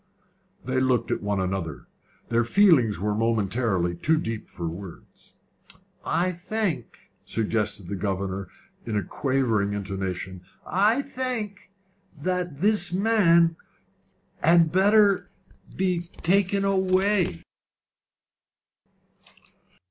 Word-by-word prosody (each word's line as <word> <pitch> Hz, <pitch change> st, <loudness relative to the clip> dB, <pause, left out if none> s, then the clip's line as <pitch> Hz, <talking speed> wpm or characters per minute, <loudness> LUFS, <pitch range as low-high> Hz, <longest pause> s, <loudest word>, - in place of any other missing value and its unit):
They 130 Hz, +1 st, 0 dB
looked 125 Hz, -3 st, +1 dB
at -, -, -1 dB
one 100 Hz, -1 st, -1 dB
another. 95 Hz, -5 st, -3 dB, 0.4 s
Their 120 Hz, 0 st, +2 dB
feelings 130 Hz, -, +4 dB
were 105 Hz, +2 st, 0 dB
momentarily 105 Hz, -4 st, 0 dB
too 155 Hz, -, +1 dB
deep 115 Hz, -7 st, -4 dB
for 85 Hz, -, -5 dB
words. 85 Hz, +2 st, -10 dB, 0.7 s
"I 180 Hz, +2 st, +1 dB
think," 180 Hz, -, -4 dB
suggested 105 Hz, -3 st, -2 dB
the 100 Hz, -, -5 dB
governor, 95 Hz, -1 st, -3 dB, 0.4 s
with 105 Hz, -5 st, -2 dB
quavering 120 Hz, -7 st, 0 dB
intonation, 95 Hz, -2 st, -4 dB, 0.2 s
"I 215 Hz, +8 st, +2 dB
think 240 Hz, -8 st, -4 dB, 0.5 s
that 175 Hz, -2 st, -2 dB
this 210 Hz, -1 st, +2 dB
man 175 Hz, -5 st, +4 dB, 0.9 s
had 165 Hz, 0 st, +5 dB
better 200 Hz, -1 st, +4 dB, 0.5 s
be 185 Hz, -2 st, +1 dB
taken 195 Hz, +3 st, 0 dB
away." 190 Hz, -, +1 dB
135 Hz, 95 wpm, -25 LUFS, -, 0.9 s, had